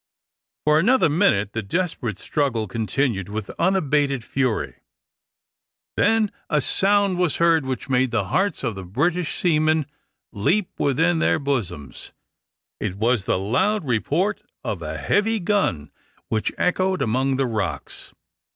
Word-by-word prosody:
For 150 0 +5
another 230 +1 +4
minute 105 - +2
the 115 - -2
desperate 120 - -2
struggle 120 -4 -1
continued 110 -1 -1
with 105 -1 -5
unabated 150 -8 +1
fury. 130 -2 -1 1.2
Then 225 -1 +2 0.2
a 150 - +2
sound 195 +4 +2
was 180 -5 +2
heard 165 -4 +3
which 130 -3 -4
made 130 -1 +2
the 100 -5 -1
hearts 190 -5 +1
of 115 -3 -1
the 95 -1 -7
British 155 - -1
seamen 155 -2 +2 0.5
leap 175 - 0
within 165 +5 +2
their - - +2
bosoms 125 - -3 0.7
it 90 - -3
was 110 0 +1
the - - +1
loud 140 - 0
report 150 - 0 0.2
of - - -3
a - - -4
heavy 220 +2 +1
gun 170 - 0 0.4
which 110 -1 0
echoed 185 +1 +1
among 130 +4 +1
the 135 0 +1
rocks. 105 -8 -4
140 Hz, 135 wpm, -23 LUFS, 110-180 Hz, 1.2 s, For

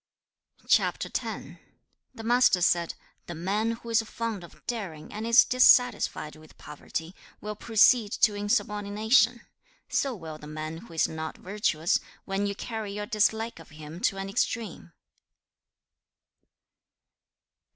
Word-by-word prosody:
CHAP. - - +3
X. - - -4 0.7
The 225 - -8
Master 240 -4 +4
said, 170 -1 +2 0.3
'The 175 - -6
man 200 +7 -1
who 230 0 -10
is 225 0 +4
fond 225 -3 -5
of 170 - -15
daring 185 -10 -5
and 215 +2 -4
is 235 +2 +7
dissatisfied 245 -10 +4
with 155 0 -17
poverty, 160 +3 -6 0.3
will 210 0 -5
proceed 225 0 +4
to 220 -2 +3
insubordination. 210 +3 +1 0.5
So 270 -3 0
will 160 -5 -8
the 150 - -11
man 155 +1 -5
who 170 -1 -13
is 160 - +3
not 160 0 -6
virtuous, 180 -4 0 0.3
when 195 +1 -1
you 200 - -3
carry 220 -2 -5
your 210 0 -4
dislike 220 +1 0
of - - -14
him 155 +1 -10
to 195 -2 0
an 195 0 -4
extreme.' 200 - -3
205 Hz, 130 wpm, -27 LUFS, 165-225 Hz, 0.7 s, is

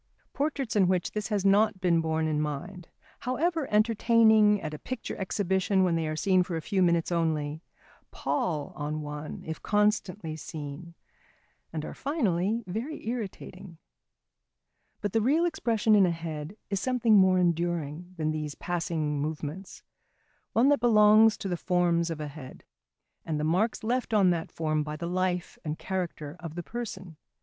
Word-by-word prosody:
Portraits 280 -5 -2
in 195 -3 +4
which 180 -1 0
this 210 -1 -3
has 205 -3 -1
not 205 +1 +4
been 175 -3 +2
borne 160 0 0
in 150 -1 0
mind, 150 +4 -5 0.3
however 305 +4 -1
entertaining 220 -1 +4
at 155 - -5
a 150 - -6
picture 255 -2 -5
exhibition, 190 0 +1
when 175 -2 +2
they 165 -1 -1
are 155 - -2
seen 185 +3 +3
for 175 -1 -3
a 160 - -2
few 195 +1 0
moments 170 -1 +2
only, 155 -2 -1 0.5
pall 145 +2 -2
on 150 +1 -3
one 150 +1 -6
if 160 0 -5
constantly 205 -5 0
seen, 160 +1 -8 0.8
and 155 -1 -4
are - - -6
finally 225 - 0
very 225 - -5
irritating. 195 -6 -6 1.2
But 205 -2 -2
the 225 - +3
real 300 +9 +3
expression 230 -10 +1
in 200 -3 +6
a - - +2
head 165 +2 -5
is 195 - 0
something 245 -2 +2
more 190 -1 +5
enduring 175 -1 -1
than 155 -1 0
these 150 -2 -4
passing 160 -4 -2
movements: 155 +4 -5 0.7
one 245 +5 +4
that 290 - +4
belongs 215 -1 +6
to 200 - -5
the 180 - -1
forms 175 -1 +1
of 165 -2 -4
a 150 - -4
head, 140 -3 -10 0.6
and 155 -2 -2
the - - -1
marks 185 +10 +1
left 240 0 0
on 190 -4 +5
that 165 -2 -2
form 155 -1 -1
by 150 0 -4
the 170 - -5
life 180 0 -1
and 155 0 -3
character 175 -5 -4
of 165 -3 -7
the 175 - -4
person. 190 -7 -7
180 Hz, 165 wpm, -28 LUFS, 160-210 Hz, 1.2 s, in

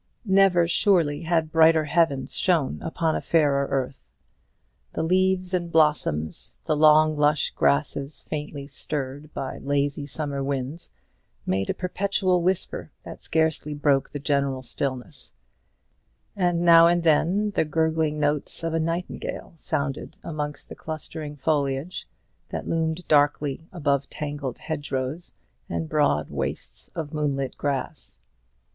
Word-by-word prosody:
Never 190 -3 +4
surely 170 -5 +2
had 160 -2 0
brighter 160 -1 +5
heavens 150 -4 +1
shone 170 -7 +1
upon 160 -1 -1
a - - -2
fairer 140 -4 +2
earth. 135 -1 -2 0.9
The - - -1
leaves 185 +1 +2
and 175 -2 -1
blossoms, 80 - +1
the 155 - +1
long 155 +1 +5
lush 150 0 +2
grasses 135 - 0
faintly 145 -2 -5
stirred 145 0 -5
by 135 -1 -4
lazy 145 0 -1
summer 140 -1 -3
winds, 135 +3 -3 0.6
made 95 +1 -1
a - - 0
perpetual 185 0 0
whisper 185 +1 -1
that - - -9
scarcely 160 -2 0
broke 145 -2 +2
the - - -5
general 140 -2 0
stillness: 130 +2 -5 1.0
and 175 -3 +1
now 170 -1 +8
and 175 0 +2
then 180 +6 +2
the - - +1
gurgling 160 -1 0
notes 145 +2 -1
of 165 -1 -1
a 165 - +1
nightingale 165 +2 -4
sounded 140 -3 -3
amongst 150 -2 -5
the - - -9
clustering 155 -1 -6
foliage 145 +2 -1 0.4
that - - -5
loomed 165 +1 -1
darkly 145 +1 +2
above 140 -6 0
tangled 145 -4 -5
hedgerows, 145 +1 -4 0.3
and 80 -1 -3
broad 145 - +1
wastes 70 +1 -4
of 160 -2 -5
moonlit 140 -3 -1
grass. 140 -2 -4
150 Hz, 125 wpm, -25 LUFS, 140-165 Hz, 1.0 s, now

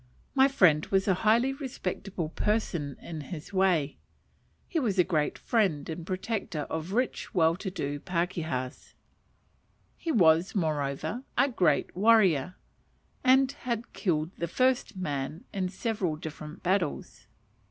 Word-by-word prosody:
My 265 -1 +6
friend 175 - +4
was 195 0 +1
a 190 - +5
highly 235 +5 +3
respectable 195 - -4
person 170 - -1
in 160 -2 -6
his 160 +4 -8
way; 180 -7 +2 0.7
he 335 - 0
was 215 -9 0
a 180 - +6
great 155 -5 0
friend 190 -11 +1
and 165 +1 -6
protector 185 -4 -3
of 160 +4 -3
rich, 250 -2 -1
well 165 -2 +4
to 195 - -4
do 145 -6 -3
pakehas; 170 -7 -3 1.0
he 330 - -3
was, 170 - +4
moreover, 155 - -1 0.2
a 275 +3 +4
great 190 -8 +1
warrior, 185 -6 +4 0.7
and 265 0 +5
had 240 -5 -4
killed 160 -4 0
the 170 - -1
first 255 +4 +1
man 150 -2 -3
in 185 -2 -1
several 190 -4 -2
different 155 0 -8
battles. 155 - -1
180 Hz, 130 wpm, -29 LUFS, 155-220 Hz, 1.0 s, My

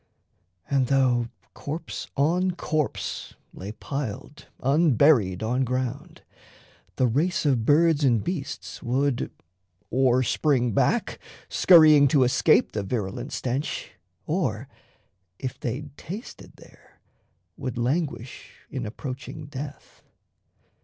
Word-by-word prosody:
And 135 -2 +1
though 125 -3 +2 0.3
corpse 155 +3 -6
on 175 +6 +2
corpse 155 -4 -3 0.2
lay 100 +3 -7
piled 140 +4 -6
Unburied 135 - +3
on 125 +4 +1
ground, 130 +6 -4 0.7
the 130 - +2
race 160 - +1
of 125 -6 +2
birds 155 0 +4
and 120 -6 +3
beasts 170 -6 -5
Would 135 0 0 0.6
or 130 0 +3
spring 125 -2 +1
back, - - +1 0.3
scurrying 155 -5 +7
to 135 -1 +4
escape 125 - +3
The 105 - -2
virulent 100 -1 -4
stench, 130 +3 -3 0.3
or, - - -1 0.7
if 130 - -5
they'd 140 +4 -5
tasted 205 - -9
there, - - -20 0.6
Would 130 -3 -5
languish 130 -1 -3 0.2
in 125 -4 -4
approaching 135 +6 -7
death. 140 0 -9
135 Hz, 105 wpm, -25 LUFS, 125-150 Hz, 0.7 s, scurrying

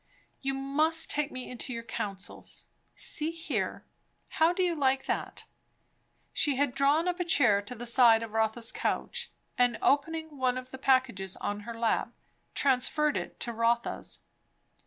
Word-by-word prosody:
"You 270 0 -1
must 305 +4 +2
take 300 +1 0
me 255 -1 -6
into 250 +1 -4
your 230 -1 -4
counsels. 200 -4 -5 0.3
See 310 +1 +1
here 330 0 -3 0.4
how 320 +1 +3
do 370 +1 0
you 355 -1 +2
like 270 -3 +1
that?" - - -2 0.9
She 290 -2 +2
had 275 -1 +1
drawn 285 +5 +3
up 360 0 -1
a - - +1
chair 245 - +4
to 205 +5 -8
the 240 +1 -7
side 235 -2 +5
of 225 - -7
Rotha's 225 +1 0
couch, - - -2 0.3
and 245 -2 +3
opening 315 +1 0
one 255 -1 +1
of 255 0 -7
the 265 - -8
packages 255 -9 +1
on 205 0 -3
her 230 - -6
lap, 230 -1 0 0.4
transferred 285 +3 +2
it - - -5
to 235 - -3
Rotha's. 230 +1 0
260 Hz, 155 wpm, -29 LUFS, 235-300 Hz, 0.9 s, side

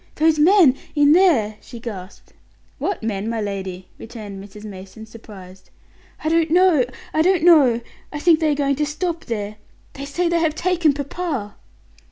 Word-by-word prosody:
"Those 315 0 +2
men 330 -4 +5 0.2
in 290 -1 +4
there!" 295 - +3
she 240 - -11
gasped. 200 -5 -9 0.5
"What 395 - -3
men, 215 -1 -3
my 230 -1 -2
lady?" 190 -3 -5
returned 210 -4 -9
Mrs. 205 +1 -13
Mason, 195 +2 -10
surprised. 200 -4 -14 0.5
"I - - -2
don't 325 0 +2
know; 345 -6 +4 0.3
I 315 - +2
don't 360 0 +2
know. 280 -9 +5 0.3
I 295 - -5
think 320 +1 +3
they 315 -2 +1
are - - 0
going 280 -1 0
to 300 - 0
stop 330 +2 -4
there; 210 -3 -5 0.4
they 275 - -7
say 340 +5 -1
they 340 0 +1
have 320 -2 0
taken 340 -3 +1
papa." 285 - -4
280 Hz, 170 wpm, -21 LUFS, 210-325 Hz, 0.5 s, men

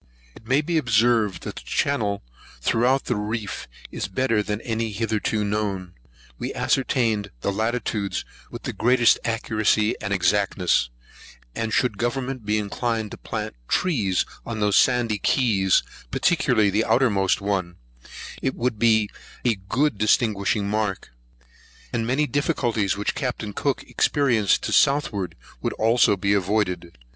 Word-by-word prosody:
It 110 - -16
may 135 +4 +3
be 165 +1 0
observed, 115 -5 +2
that - - -6
the - - -6
channel 110 -8 -1 0.4
throughout 125 - +2
the 125 - 0
reef 105 -1 -4 0.2
is - - -3
better 115 +1 +1
than 105 0 -3
any 115 -1 -2
hitherto 110 0 -1
known. 100 -4 -2 0.5
We - - -4
ascertained 115 -6 +1
the 100 - 0
latitudes 110 -1 -2 0.2
with - - -9
the - - -4
greatest 120 +1 +4
accuracy 110 -1 +1
and 100 - -4
exactness; 95 -7 +2 0.6
and 115 -1 -3
should 110 -3 +1
government 125 -1 -2
be 105 +1 +2
inclined 110 +1 -2
to - - -7
plant 110 -1 -5
trees 110 - +1 0.2
on 115 -2 -5
those 105 -1 +2
sandy 120 -4 +3
keys, 100 -8 +2 0.3
particularly 105 - +2
the 105 +3 +2
outermost 100 -7 +2
one, 95 -4 -2 0.7
it 130 - -1
would 115 -3 -1
be 110 -2 +4 0.4
a 120 - +4
good 110 +5 -1
distinguishing 105 -2 +2
mark; 105 - -2 0.8
and 115 -1 -1
many 135 +5 +2
difficulties 120 - 0
which 105 - -1
Capt. 125 -4 -3
Cook 140 +5 -1
experienced 120 -9 +2
to - - -2
the - - -2
southward 120 - +2 0.3
would - - -1
also 115 -2 +3
be 100 +2 +1
avoided. 95 -4 -1
110 Hz, 140 wpm, -24 LUFS, 100-120 Hz, 0.8 s, greatest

